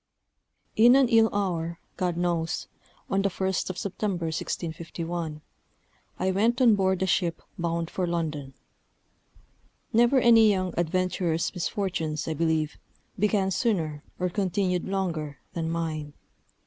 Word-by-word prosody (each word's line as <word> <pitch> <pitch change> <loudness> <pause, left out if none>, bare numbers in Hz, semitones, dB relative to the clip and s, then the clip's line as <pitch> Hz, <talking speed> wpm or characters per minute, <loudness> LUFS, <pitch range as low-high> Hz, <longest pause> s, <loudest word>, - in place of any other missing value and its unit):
In 240 +3 +7
an 270 -3 +5
ill 225 -2 +5
hour, 170 -4 -1 0.2
God 180 -2 -1
knows, 170 -2 -1 0.4
on 195 - +1
the 200 - +1
1st 190 0 -1
of 185 - -4
September, 195 -3 -2
1651, 165 0 -4 0.8
I 190 +1 +1
went 225 +6 +2
on 245 -4 +6
board 190 -2 +1
a - - +2
ship 175 -2 0
bound 170 -2 -2
for 180 -2 -1
London. 155 -6 -3 1.4
Never 240 +4 +5
any 230 -3 +6
young 185 -3 0
adventurer's 175 -1 0
misfortunes, 170 -4 -2
I 160 - 0
believe, 160 -1 0 0.4
began 200 -1 +2
sooner, 165 - 0
or 180 0 0
continued 185 -1 0
longer, 165 -7 -2 0.2
than 165 -1 -2
mine. 155 -3 -3
180 Hz, 125 wpm, -27 LUFS, 165-195 Hz, 1.4 s, In